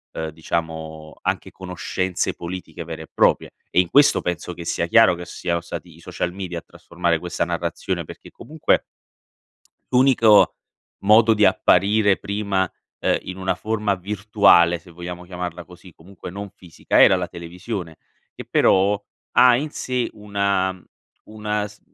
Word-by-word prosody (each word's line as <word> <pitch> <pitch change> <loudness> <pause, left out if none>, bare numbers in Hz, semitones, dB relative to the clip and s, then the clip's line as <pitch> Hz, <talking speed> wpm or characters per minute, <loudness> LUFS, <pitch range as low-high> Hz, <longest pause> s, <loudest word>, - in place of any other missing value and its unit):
uhm, 80 -1 -3
diciamo 80 -1 -5
anche - - -2
conoscenze 95 0 -3
politiche 90 0 -7
vere 80 -1 -7
e - - -15
proprie. - - +2 0.2
E - - +2
in 90 - -5
questo 145 +6 +5
penso 90 0 -4
che 85 - -9
sia 85 - -1
chiaro 115 +2 +6
che 90 0 -8
siano 85 0 -3
stati 85 0 -8
i - - -18
social 85 +1 -4
media 90 -3 -5
a - - -17
trasformare 85 -1 -2
questa 90 +1 -2
narrazione 85 0 -3
perché - - -12
comunque 155 +1 -1 1.1
l'unico 125 -5 +5 0.5
modo 110 +2 +6
di 105 0 +3
apparire 100 +2 +3
prima, 100 -2 -1 0.3
uhm, - - +2
in 90 - -7
una 95 -1 -1
forma 105 0 -1
virtuale, 95 -3 +3
se 85 +1 -18
vogliamo 90 +1 -8
chiamarla 90 -1 -6
così, 90 +1 -15
comunque 90 +3 -11
non 100 +2 -7
fisica, 90 -4 -1
era 95 - +6
la 90 -1 -3
televisione, 85 +1 -7 0.4
che - - -9
però 100 +2 +3 0.3
ha 125 0 +6
in 150 +4 -3
sé 125 -4 -2
una 100 -3 -1 0.4
una 105 -1 -3
s 105 0 -16
90 Hz, 150 wpm, -22 LUFS, 85-105 Hz, 1.1 s, chiaro